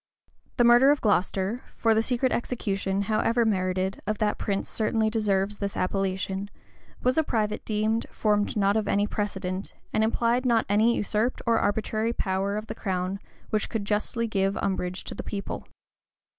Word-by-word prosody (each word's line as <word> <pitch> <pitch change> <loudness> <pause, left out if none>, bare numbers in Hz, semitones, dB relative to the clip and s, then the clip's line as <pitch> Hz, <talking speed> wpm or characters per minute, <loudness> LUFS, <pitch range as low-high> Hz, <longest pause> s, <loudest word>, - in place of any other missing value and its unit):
The 240 - +5
murder 240 +3 +7
of 290 0 +4
Glocester 200 +2 +1
(for 225 -1 +3
the 220 - +3
secret 250 +2 +1
execution, 200 -5 -1
however 225 +3 +2
merited, 185 -2 0
of 215 0 0
that 210 0 0
prince 200 -1 -1
certainly 220 0 0
deserves 205 -2 +1
this 200 -1 -3
appellation) 190 +1 -1 0.5
was 255 +4 +3
a - - +3
private 215 -6 -1
deed 220 +1 0
formed 210 -1 0
not 205 +1 +2
any 205 +1 +2
precedent, 195 -2 -3 0.2
and 215 - +3
implied 235 +2 +1
not 235 -3 +3
any 215 +4 +3
usurped 215 +4 -1
or 230 -1 +3
arbitrary 220 +2 0
power 195 0 -1
of 215 - -4
the - - -5
crown 185 0 -2 0.3
which 215 -1 0
could 215 -3 -3
justly 215 +3 -1
give 195 -2 0
umbrage 185 -1 -2
to - - -6
the - - -5
people. 200 -1 -5
210 Hz, 160 wpm, -26 LUFS, 195-225 Hz, 0.5 s, murder